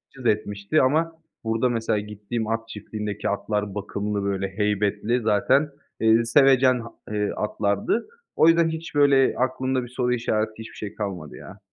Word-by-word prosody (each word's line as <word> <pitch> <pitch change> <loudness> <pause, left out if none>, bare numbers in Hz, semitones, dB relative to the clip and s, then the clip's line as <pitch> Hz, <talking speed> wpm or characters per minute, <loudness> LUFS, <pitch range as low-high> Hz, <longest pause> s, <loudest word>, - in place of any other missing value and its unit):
cız 130 -2 -11
etmişti 105 +4 +1
ama 160 +5 +1 0.3
burada 115 +2 +1
mesela 115 -3 0
gittiğim 105 +2 -5
at 115 0 -2
çiftliğindeki 105 -1 -4
atlar 105 0 -2
bakımlı, 105 0 -3
böyle, 100 -1 -1
heybetli 105 +3 0
zaten, 130 +7 +2 0.3
eee, 115 +1 +4
sevecen, 130 +1 +5
ha 115 0 -8 0.2
eee, 105 -1 0
atlardı. 105 - -1 0.3
O 155 - +5
yüzden 165 0 +5
hiç, 160 -1 -6
böyle, 140 -2 +4
aklımda 130 0 0
bir 120 - -7
soru 125 0 0
işareti, 110 -2 0
hiçbir 110 - -9
şey 105 0 -7
kalmadı 95 -8 -5
ya. 100 - -12
110 Hz, 155 wpm, -24 LUFS, 105-130 Hz, 0.3 s, sevecen